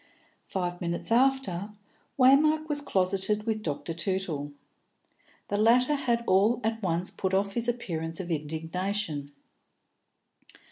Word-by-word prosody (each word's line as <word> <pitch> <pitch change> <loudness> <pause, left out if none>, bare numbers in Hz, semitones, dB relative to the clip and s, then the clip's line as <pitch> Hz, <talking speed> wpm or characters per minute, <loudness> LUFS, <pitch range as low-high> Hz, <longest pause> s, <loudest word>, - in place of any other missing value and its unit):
Five 175 -1 -3
minutes 170 +4 -3
after, 230 -6 +1 0.4
Waymark 305 +4 +5
was 295 -2 -1
closeted 195 -3 +1
with 220 -1 -2
Dr. 165 -1 -4
Tootle. 165 -4 -2 1.0
The 205 - 0
latter 245 +6 +4
had 240 -5 0
all 210 +5 +3
at 225 +1 -1
once 175 -1 -1
put 190 0 -1
off 200 +1 0
his 235 +1 -1
appearance 165 -9 -3
of 180 -2 -5
indignation. 160 0 -3
195 Hz, 120 wpm, -28 LUFS, 170-235 Hz, 1.0 s, Waymark